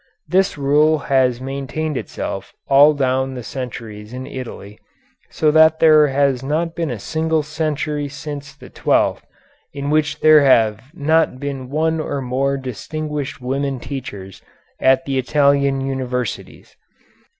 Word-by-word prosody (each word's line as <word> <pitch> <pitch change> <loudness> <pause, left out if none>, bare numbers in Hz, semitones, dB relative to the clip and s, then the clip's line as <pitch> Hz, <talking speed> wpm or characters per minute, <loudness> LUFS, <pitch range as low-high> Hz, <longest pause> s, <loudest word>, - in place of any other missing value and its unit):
This 190 -2 +1
rule 150 +3 +3 0.2
has 125 -2 +3
maintained 140 +3 -4
itself 100 -5 -5
all 145 +2 +6
down 130 -1 0
the 125 - -6
centuries 110 -1 -7
in 130 +1 -6
Italy, 115 -6 -8 0.5
so 155 -1 +1
that 160 +1 +5
there 155 -2 +6
has 135 -2 +1
not 160 +5 -1
been 165 -2 -2
a 120 - -3
single 160 +6 -1
century 150 -1 -2
since 140 0 -8
the - - -14
twelfth - - +1 0.5
in 140 0 -3
which 150 -1 0
there 155 -1 +7
have 110 -6 +3
not 160 -3 +1
been 135 -2 -5
one 160 +3 0
or 145 -2 -3
more 135 +2 -1
distinguished 145 +3 -5
women 135 +1 -2
teachers 105 -9 -8 0.4
at 130 0 +3
the 135 -1 -1
Italian 140 0 +2
universities. 130 -3 -4
140 Hz, 135 wpm, -19 LUFS, 130-150 Hz, 0.5 s, there